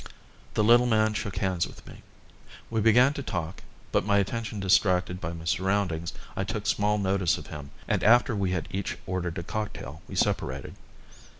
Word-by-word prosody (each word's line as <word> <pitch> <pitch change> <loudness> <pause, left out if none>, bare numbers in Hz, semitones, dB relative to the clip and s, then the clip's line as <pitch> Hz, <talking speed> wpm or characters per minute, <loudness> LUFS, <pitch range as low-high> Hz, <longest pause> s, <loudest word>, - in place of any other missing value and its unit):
The 105 - +3
little 120 +3 +6
man 110 -2 +3
shook 105 -3 -3
hands 95 -2 0
with - - -14
me. - - -12 0.7
We 110 -1 +1
began 120 +6 +5
to 140 - -5
talk, 90 -8 -4 0.3
but, - - +2
my 100 +1 +2
attention 110 +2 -2
distracted 90 -1 +2
by 80 - -3
my 85 -1 -8
surroundings, 90 -2 0 0.2
I 95 - -1
took 105 +1 -4
small 105 -1 +2
notice 95 -3 +1
of - - -9
him, 75 -2 -7 0.2
and - - 0
after 120 +2 +5
we 100 -2 0
had 90 -3 -2
each 95 +1 -3
ordered 90 -2 -3
a 85 - -3
cocktail 85 -8 -5
we - - -8
separated. 65 +1 -1
95 Hz, 180 wpm, -27 LUFS, 90-110 Hz, 0.7 s, little